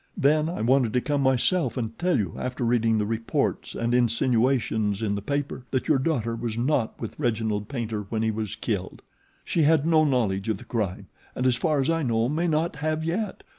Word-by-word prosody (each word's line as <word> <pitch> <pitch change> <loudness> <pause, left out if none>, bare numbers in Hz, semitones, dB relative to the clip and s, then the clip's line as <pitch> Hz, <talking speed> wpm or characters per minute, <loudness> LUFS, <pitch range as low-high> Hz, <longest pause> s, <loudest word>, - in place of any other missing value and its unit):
Then 150 +3 +3
I 170 - -4
wanted 125 -1 +3
to 125 - +2
come 145 +1 0
myself 130 +2 +2
and 115 -2 -3
tell 180 0 +2
you, 95 -7 -2
after 125 0 -3
reading 115 -1 +2
the 105 - +1
reports 115 +1 -2
and 115 +1 -1
insinuations 115 -3 +1
in 105 -2 0
the 100 - -2
paper, 140 +1 -3
that 130 - -1
your 145 -4 +3
daughter 125 -6 0
was 115 -1 -4
not 125 -2 0
with 115 - -7
Reginald 110 -5 -1
Paynter 110 -6 -3
when 110 -1 -1
he 110 - +1
was 110 -1 -3
killed. - - -4 0.4
She 170 - +1
had 155 -1 +4
no 160 -1 +4
knowledge 115 -8 0
of 110 - 0
the - - -12
crime 105 -6 -2 0.3
and 125 - -2
as 125 -1 +4
far 150 +3 +1
as 135 +4 +2
I 165 0 0
know 115 -4 +1
may 165 +4 0
not 160 +1 0
have 155 +1 -1
yet. 190 +5 -2
125 Hz, 210 wpm, -25 LUFS, 110-150 Hz, 0.4 s, had